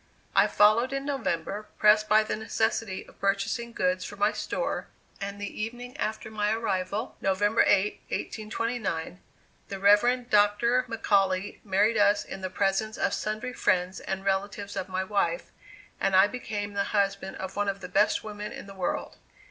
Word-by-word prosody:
I - - +6
followed 220 +5 +4
in 275 0 -2
November, 210 - -2
pressed 215 0 +5
by 215 0 +6
the 215 - -2
necessity 220 -2 -1
of - - -19
purchasing 200 +4 -1
goods 185 -4 0
for 205 - -7
my 205 +1 +2
store; - - -3 0.3
and 200 0 -5
the 205 +1 -5
evening 245 +3 -5
after 220 -4 -3
my 210 -1 0
arrival, 210 0 -2
November 205 +3 +2
8, 200 +1 +3
1829, 215 -6 -3 0.5
the 195 - -5
Rev. 240 +6 +4
Dr. 215 +3 +3
McAuley 195 -4 +1
married 205 +3 +2
us 205 0 +4
in 190 - -8
the 185 - -3
presence 200 +3 0
of - - 0
sundry 215 +4 -3
friends 180 -4 +1
and 190 0 -4
relatives 200 +1 -2
of 190 -1 -4
my 185 0 -1
wife, 205 - -1 0.5
and 195 -1 +1
I 190 +1 +8
became 205 -2 -4
the 200 0 0
husband 195 -1 0
of 190 - -6
one 205 0 0
of 195 0 -4
the 180 - -6
best 195 +3 +2
women 210 -1 -6
in - - -8
the 195 - -10
world. 185 -2 -3
205 Hz, 165 wpm, -27 LUFS, 195-220 Hz, 0.5 s, I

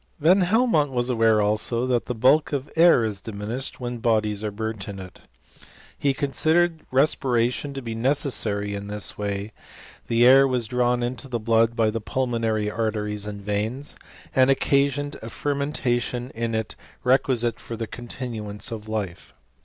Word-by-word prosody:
Van 175 +6 +5
Helmont 185 - +3
was 125 -1 -1
aware, 115 -3 +3
also, 110 +3 +1
that 125 -2 0
the 125 - -2
bulk 135 +7 +3
of 140 0 -3
air 165 -8 +6
is 105 -3 -3
diminished 110 +5 -5
when 120 -1 -4
bodies 110 -3 +1
are 105 - -1
burnt 110 -1 -5
in 100 - -6
it. 95 -1 -10 0.8
He 140 - +1
considered 160 +5 +1
respiration 130 -1 +1
to 135 - -5
be 115 -1 -4
necessary 115 -5 0
in 100 0 -5
this 105 -1 -2
way 100 0 -3
J - - -30 0.5
the 115 +1 +3
air 135 +2 +7
was 125 -3 -1
drawn 125 +1 +1
into 125 +3 -4
the 125 -2 -2
blood 115 +1 +2
by 110 -2 +2
the 115 0 -3
pulmonary 115 -3 -1
arteries 105 -1 -2
and 100 -1 -7
veins, 110 +7 -3 0.4
and 130 0 +5
occasioned 140 +1 +1
a 115 - -7
fermentation 130 -3 -2
id 115 0 -2
it 110 0 -3 0.3
requisite 125 -2 +2
for 115 - -7
the 115 - -3
continuance 115 -2 -6
of 110 -1 -7
life. 100 -5 -5
120 Hz, 160 wpm, -24 LUFS, 110-135 Hz, 0.8 s, air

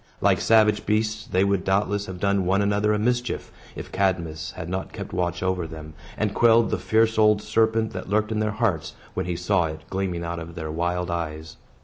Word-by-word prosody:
Like - - +3
savage 110 -2 +4
beasts, 110 0 0
they 95 +1 +2
would 100 -2 +1
doubtless 100 +1 0
have 95 -1 -7
done 100 0 +1
one 95 +3 +2
another 105 +1 +2
a 105 - +2
mischief, 120 +3 -1 0.2
if - - -8
Cadmus 90 -5 -1
had 80 - -6
not 95 +2 -4
kept - - -7
watch 90 0 -1
over 95 -3 -1
them, 80 -1 -9 0.2
and 105 -1 0
quelled 115 +1 +4
the - - 0
fierce 110 0 +2
old 105 -1 +5
serpent 110 +1 +1
that 95 0 -6
lurked 110 +1 +1
in 110 - 0
their 110 0 +1
hearts, 100 -8 -1 0.2
when - - -3
he 90 - -1
saw 90 +1 +1
it 80 0 -5
gleaming 95 -3 -2
out 85 0 -4
of 85 0 -8
their 80 -2 -5
wild 90 +2 -1
eyes. 80 -2 -4
95 Hz, 210 wpm, -24 LUFS, 85-105 Hz, 0.2 s, old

